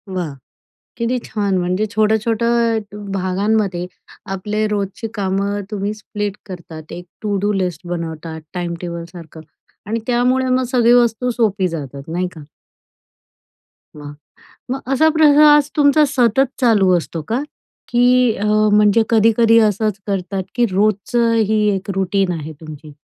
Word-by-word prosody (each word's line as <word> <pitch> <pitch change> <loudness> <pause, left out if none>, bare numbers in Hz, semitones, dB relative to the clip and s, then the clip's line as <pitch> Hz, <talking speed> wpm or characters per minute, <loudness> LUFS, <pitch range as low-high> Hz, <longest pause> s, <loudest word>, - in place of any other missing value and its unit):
वाह! 170 -5 -3 0.6
किती 235 +2 -1
छान! 200 -3 -1
म्हणजे 185 +4 -1
छोटं-छोटं 225 +2 +1
भ 205 -1 -8
भागांमध्ये, 190 -1 -1 0.5
आपले 210 +3 -2
रोजची 205 +2 -3
कामं 200 0 -1
तुम्ही 205 0 -2
स्प्लिट 205 -1 -5
करतात. 165 -4 -10
एक 175 - -8 0.2
टू-डू 205 -1 0
लिस्ट 180 -3 -3
बनवतात, 165 -2 -5
टाईमटेबलसारखं 170 -1 -6 0.5
आणि 225 +2 -2
त्यामुळे 250 +1 +1
मग 255 0 +2
सगळी 240 -2 +4
वस्तू 245 0 +2
सोपी 205 -6 0
जातात, 140 -4 -6
नाही 175 +3 -1
का? 160 - -11 1.6
वाह! 145 -1 -9 0.6
मग 270 - -3
असा 315 +4 +4
प्रयास 295 -1 +6
तुमचा 295 0 +5
सतत 255 0 +3
चालू 205 -7 +4
असतो 165 -1 -4
का? 240 +5 -1 0.5
की 240 0 +1 0.3
अ, 205 - -4 0.3
म्हणजे 210 +1 +4
कधी-कधी 230 0 +4
असंच 210 0 -2
करतात 195 -1 -2
की 245 - +2
रोजचं 215 +4 +1 0.2
ही 215 0 +2 0.2
एक 190 +2 -6
रूटीन 195 0 0
आहे 160 -2 -6
तुमची? 155 -1 -11
205 Hz, 125 wpm, -18 LUFS, 180-230 Hz, 1.6 s, प्रयास